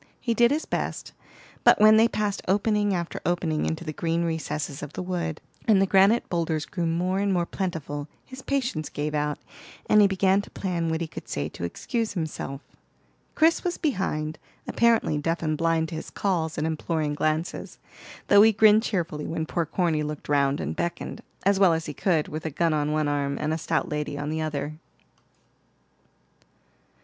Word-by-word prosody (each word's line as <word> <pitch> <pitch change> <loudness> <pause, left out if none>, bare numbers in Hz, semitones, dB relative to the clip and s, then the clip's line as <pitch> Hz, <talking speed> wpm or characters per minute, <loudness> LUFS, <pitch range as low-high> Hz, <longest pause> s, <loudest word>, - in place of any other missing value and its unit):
He 235 - 0
did 235 +1 +5
his 305 +3 -1
best, - - -3 0.5
but - - +6
when 215 +1 +8
they 225 +1 +6
passed 210 -3 -2
opening 205 +1 +2
after 170 -1 -4
opening 165 -3 0
into 160 +1 -3
the 155 -2 -5
green 165 +2 -1
recesses 155 -3 -3
of 145 0 -7
the - - -4
wood, 170 -4 -3 0.3
and 210 -4 +5
the 195 - +4
granite 195 +5 +4
boulders 165 -3 -1
grew 170 -3 -2
more 180 +3 0
and 200 0 +1
more 175 -2 +1
plentiful, 155 -6 -4 0.2
his 260 0 -10
patience 250 - -2
gave 150 +1 -3
out, 150 0 -1 0.5
and 210 - +5
he 205 - +7
began 195 0 +2
to - - -13
plan 175 -4 -2
what 160 +1 -1
he 165 - -2
could - - -9
say 70 +1 -2
to 85 - -9
excuse 225 - -3
himself. 155 -5 -4 0.7
Chris 325 +2 +3
was 355 -1 -1
behind, 160 - -2 0.3
apparently 230 -10 +2
deaf 165 +3 -1
and 155 -1 0
blind 165 0 +1
to 165 - -6
his - - -7
calls 165 -5 -1
and 155 - 0
imploring 160 -1 -1
glances, 155 +3 -2 0.5
though 205 - +7
he 220 +1 +7
grinned 215 0 +6
cheerfully 175 -9 -2
when 160 -1 -2
poor 165 0 -2
Corny 165 -3 0
looked 150 0 -5
round 140 -1 +2
and - - -3
beckoned, 170 0 -4 0.2
as 200 0 +3
well 190 -4 +6
as 160 0 -2
he 150 - -5
could, 160 0 +1
with 155 +1 -6
a 160 - -2
gun 165 +2 +1
on 150 0 0
one 155 -1 +1
arm 140 -1 -1
and 155 +1 -1
a - - -1
stout - - -1
lady 150 -1 -3
on 145 +1 -3
the 160 0 -2
other. 150 -1 -3
165 Hz, 190 wpm, -26 LUFS, 155-195 Hz, 0.7 s, when